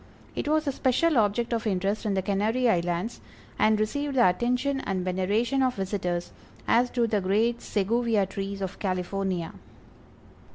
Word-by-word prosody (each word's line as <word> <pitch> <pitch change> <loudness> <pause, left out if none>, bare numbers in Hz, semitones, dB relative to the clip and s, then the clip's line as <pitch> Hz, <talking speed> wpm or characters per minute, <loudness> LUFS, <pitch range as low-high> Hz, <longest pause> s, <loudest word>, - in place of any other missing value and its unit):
It - - -3
was 310 +1 +2
a 280 - +1
special 275 +5 +2
object 225 +3 +1
of 225 -1 -1
interest 200 +3 -1
in 200 - 0
the 190 - 0
Canary 215 +6 +1
Islands, 175 +1 0 0.4
and 215 0 +4
received 280 +6 -1
the 240 -2 +6
attention 250 +8 0
and 190 -6 -2
veneration 205 +8 0
of 255 -1 +2
visitors, 180 -3 -2 0.4
as 245 +2 +3
do 240 -1 +1
the 215 -3 0
great 220 +5 +1
Seguvia 220 0 +1
trees 195 +1 -5
of 190 - -5
California. 185 -2 -2
215 Hz, 155 wpm, -27 LUFS, 190-240 Hz, 0.4 s, the